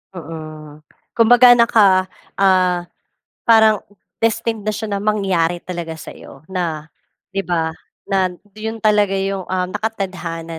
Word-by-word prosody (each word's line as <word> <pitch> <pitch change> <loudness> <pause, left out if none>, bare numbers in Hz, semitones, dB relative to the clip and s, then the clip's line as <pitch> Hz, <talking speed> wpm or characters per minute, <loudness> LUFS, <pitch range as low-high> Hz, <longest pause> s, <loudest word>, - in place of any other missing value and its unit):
Mm. 155 -2 -9 0.3
Kumbaga, 245 +2 +7
naka, 205 -6 +4 0.3
ah, 185 -2 +3 0.7
parang 220 -2 +5 0.4
destined 225 0 0
na 215 - +1
siya 220 +1 -4
na 200 - -1
mangyari 190 -5 0
talaga 170 -3 -5
sa'yo 135 -3 -12
na, 165 -4 -3 0.4
'di 195 - -1
ba, 165 -2 0 0.4
na 190 -2 +2 0.3
'yon 220 +1 -4
talaga 210 -2 +3
'yong, 195 -1 -2
um, 185 -1 -1
nakatadhana 185 -6 -4
190 Hz, 120 wpm, -19 LUFS, 170-215 Hz, 0.7 s, Kumbaga